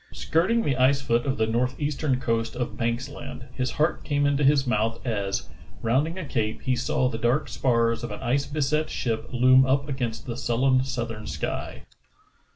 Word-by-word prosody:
Skirting 195 +9 +1
the 135 -3 0
ice 130 +2 +4
foot 120 -1 0
of 135 - 0
the 110 - +2
northeastern 130 +4 0
coast 115 -1 -1
of 120 -3 -3
Banks 120 +2 -1
Land, 125 -1 -8
his 130 0 -1
heart 155 +3 0
came 145 -1 +1
into 145 0 +2
his 140 0 +4
mouth 115 -1 0
as, 100 -5 -2 0.4
round 130 +7 +2
ing 170 +3 -6
a 185 - -4
cape, 110 -5 -2
he 130 - +1
saw 130 0 +1
the 115 -3 -3
dark 120 +6 +1
spars 115 -2 +1
of 120 - -3
an 105 - -6
ice 135 +4 0
beset 150 +1 0
ship 115 -3 -2
loom 130 +1 +6
up 135 +2 +1
against 125 -5 -3
the 120 -2 -5
sullen 130 +1 +2
southern 115 -4 -4
sky. 75 0 -4
125 Hz, 185 wpm, -25 LUFS, 115-140 Hz, 0.4 s, loom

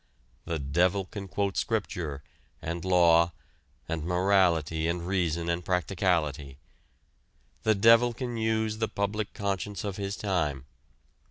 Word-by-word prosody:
The 85 - -2
devil 85 +7 +1
can 100 +1 -7
quote 100 +1 -2
Scripture, 90 -10 -2 0.4
and 85 +1 -4
law, 85 -2 +4 0.5
and 80 -1 -3
morality 90 -3 +2
and 85 0 -2
reason 85 -3 0
and 85 +1 -1
practicality. 85 -6 0 1.0
The 110 0 +3
devil 115 +4 +6
can 120 0 -5
use 110 -1 0
the 110 - +1
public 100 +1 -2
conscience 100 0 -3
of 100 -2 -4
his 100 0 -3
time. 75 -9 -1
90 Hz, 120 wpm, -28 LUFS, 85-100 Hz, 1.0 s, devil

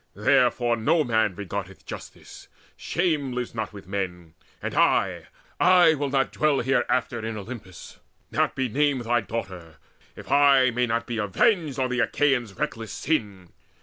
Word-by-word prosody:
Therefore 120 -1 +2
no 155 +8 +2
man 110 -6 +1
regardeth 95 -1 -6
justice: - - -10 0.3
shame 150 -7 -1
Lives 125 -1 -4
not 110 -2 -4
with 100 -2 -11
men! 90 -4 -4 0.3
And - - -5
I, - - +1 0.3
I 180 -3 +6
will 145 -2 -2
not 135 0 +1
dwell 150 -2 +1
Hereafter 120 -2 0
in 110 -1 -4
Olympus, 105 -4 -10 0.3
not - - 0
be 130 -1 0
named 140 +2 +1
Thy 120 +1 +1
daughter, 95 -6 -6 0.4
if - - -10
I 140 -3 +5
may 125 +1 0
not 115 0 -1
be 115 -1 -4
avenged 145 - +1
On 130 -1 -1
the 125 - -1
Achaeans' 125 -7 +1
reckless 115 -1 -4
sin! 105 - -2
120 Hz, 150 wpm, -25 LUFS, 105-140 Hz, 0.4 s, I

